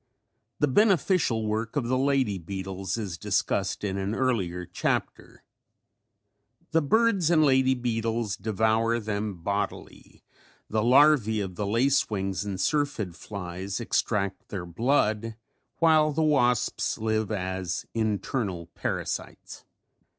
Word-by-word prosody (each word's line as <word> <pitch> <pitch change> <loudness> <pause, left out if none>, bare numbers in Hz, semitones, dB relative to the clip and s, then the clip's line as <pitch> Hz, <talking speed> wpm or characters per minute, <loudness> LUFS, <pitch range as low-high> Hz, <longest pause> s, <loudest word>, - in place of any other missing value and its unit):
The 150 - +2
beneficial 175 - +2
work 110 +1 -2
of 135 -5 0
the 130 - +1
lady 130 -7 +1
beetles 95 +2 -4
is 95 -7 -5
discussed - - -1
in 100 -1 -2
an 100 +3 -2
earlier 95 -10 -1
chapter. 90 - -3 1.3
The 165 - +3
birds 200 +1 +2
and 155 -3 +4
lady 130 -1 +4
beetles 115 -3 -1
devour 110 +3 +1
them 105 -4 -4
bodily, 100 +2 -4 0.4
the 110 0 0
larvæ 125 -4 +4
of 95 -2 -6
the 100 +3 -3
lace 125 +6 +2
wings 95 -2 -2
and 100 -2 -4
syrphid 140 - -1
flies 95 0 -6
extract 100 -4 -1
their 95 -4 -5
blood 110 - 0 0.4
while 155 -2 +4
the 160 +2 0
wasps 125 -7 +1
live 110 -1 -1
as 95 -3 -3
internal 105 -5 -2
parasites. - - -5
110 Hz, 120 wpm, -27 LUFS, 95-130 Hz, 1.3 s, and